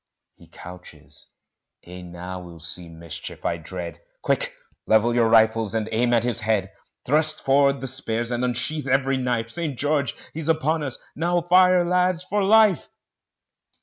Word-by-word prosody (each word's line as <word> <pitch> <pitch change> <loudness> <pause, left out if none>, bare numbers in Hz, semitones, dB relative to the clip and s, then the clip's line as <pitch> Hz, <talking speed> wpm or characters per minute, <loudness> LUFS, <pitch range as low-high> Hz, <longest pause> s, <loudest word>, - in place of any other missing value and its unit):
He - - -20
couches, 80 -5 -12 0.6
ay, 90 +1 -10
now 90 +1 -8
we'll 85 -2 -12
see 85 +2 -8
mischief, 80 -1 -9
I 85 - 0
dread: 85 0 -7 0.2
Quick - - -1 0.3
level 110 +2 +3
your 115 -1 +2
rifles 110 -1 +3
and 110 -1 -1
aim 120 +2 +1
at 115 -2 +3
his 120 -1 -1
head: 110 -3 -1 0.3
Thrust 155 +3 +4
forward 140 0 +3
the 135 - -4
spears, 120 -3 -2
and 120 +1 -1
unsheath 125 +4 -2
every 135 0 +1
knife 120 -3 -2
St. 160 -6 -4
George! 145 0 0 0.2
he's 160 0 -4
upon 160 0 +1
us! 135 -3 -3 0.2
now, 175 +3 0
fire, 180 +1 +4
lads, 180 0 +1
for 205 +2 -1
life! 215 -2 +4
125 Hz, 155 wpm, -23 LUFS, 100-155 Hz, 0.6 s, Thrust